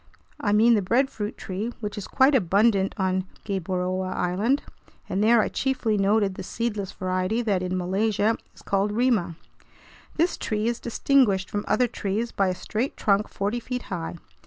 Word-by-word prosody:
I 205 Hz, -, 0 dB
mean 220 Hz, +3 st, +5 dB
the 215 Hz, -, +3 dB
breadfruit 225 Hz, 0 st, 0 dB
tree, 200 Hz, +5 st, -4 dB
which 210 Hz, -3 st, -4 dB
is 205 Hz, -, -6 dB
quite 270 Hz, +2 st, +4 dB
abundant 200 Hz, -2 st, +3 dB
on 185 Hz, -1 st, 0 dB, 0.2 s
Gueboroa 185 Hz, -1 st, -2 dB
Island, 205 Hz, +11 st, +1 dB, 0.4 s
and 200 Hz, -, 0 dB
there 230 Hz, +1 st, +5 dB
I -, -, 0 dB
chiefly 255 Hz, -5 st, 0 dB
noted 200 Hz, 0 st, +2 dB
the 185 Hz, -, -7 dB
seedless 205 Hz, 0 st, -3 dB
variety 185 Hz, +5 st, -1 dB
that 200 Hz, -5 st, +1 dB
in 185 Hz, 0 st, -2 dB
Malaysia 205 Hz, +4 st, +1 dB, 0.2 s
is -, -, -16 dB
called 200 Hz, +1 st, 0 dB
"rima." 220 Hz, -7 st, +1 dB, 0.8 s
This 335 Hz, +3 st, +1 dB
tree 215 Hz, 0 st, -2 dB
is 235 Hz, 0 st, -1 dB
distinguished 235 Hz, -5 st, +2 dB
from 205 Hz, 0 st, -2 dB
other 250 Hz, -, +3 dB
trees 220 Hz, 0 st, -2 dB
by 195 Hz, -, +1 dB
a 185 Hz, -, 0 dB
straight 225 Hz, +8 st, -3 dB
trunk 205 Hz, 0 st, +2 dB
forty 205 Hz, +4 st, -2 dB
feet 250 Hz, +1 st, -5 dB
high. 170 Hz, -1 st, -4 dB
205 Hz, 165 wpm, -25 LUFS, 190-235 Hz, 0.8 s, mean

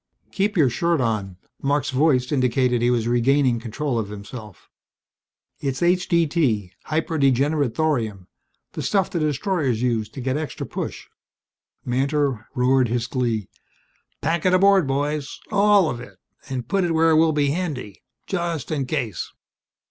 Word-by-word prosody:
"Keep 200 Hz, +1 st, 0 dB
your 140 Hz, -6 st, +4 dB
shirt 170 Hz, +7 st, +1 dB
on." 105 Hz, -6 st, -1 dB, 0.2 s
Marc's 140 Hz, 0 st, 0 dB
voice 130 Hz, -2 st, +2 dB
indicated 125 Hz, -2 st, +2 dB
he 120 Hz, -, +3 dB
was 120 Hz, -2 st, +1 dB
regaining 125 Hz, +1 st, +2 dB
control 120 Hz, +2 st, -2 dB
of 105 Hz, -2 st, -4 dB
himself. 105 Hz, 0 st, -10 dB, 0.9 s
"It's 135 Hz, +1 st, -2 dB
H.D.T. 165 Hz, -, +1 dB
Hyper 160 Hz, 0 st, -1 dB
Degenerate 140 Hz, 0 st, +2 dB
Thorium 115 Hz, -, -1 dB, 0.4 s
the -, -, -5 dB
stuff 195 Hz, -3 st, +1 dB
the 170 Hz, -, -1 dB
destroyers 150 Hz, -, 0 dB
use 115 Hz, -4 st, 0 dB
to 135 Hz, -, -10 dB
get 130 Hz, +2 st, -1 dB
extra 155 Hz, -1 st, -4 dB
push." -, -, -5 dB, 0.8 s
Mantor 135 Hz, -2 st, 0 dB
roared 130 Hz, 0 st, +3 dB
his 120 Hz, +1 st, -1 dB
glee. 120 Hz, -5 st, -1 dB, 0.7 s
"Pack 165 Hz, +2 st, 0 dB
it 185 Hz, -, +4 dB
aboard, 195 Hz, -3 st, +5 dB
boys 145 Hz, +1 st, -2 dB
all 205 Hz, -3 st, +5 dB
of 120 Hz, -5 st, -3 dB
it! 125 Hz, -, -12 dB, 0.3 s
And 125 Hz, -3 st, -4 dB
put 195 Hz, +7 st, +1 dB
it 170 Hz, -2 st, 0 dB
where 165 Hz, 0 st, +4 dB
it 155 Hz, -, +5 dB
will 160 Hz, 0 st, +4 dB
be 145 Hz, -2 st, +1 dB
handy, 145 Hz, -, -4 dB, 0.2 s
just 170 Hz, -7 st, -3 dB
in 140 Hz, -4 st, -1 dB
case." 125 Hz, -, -3 dB
135 Hz, 150 wpm, -23 LUFS, 120-160 Hz, 0.9 s, aboard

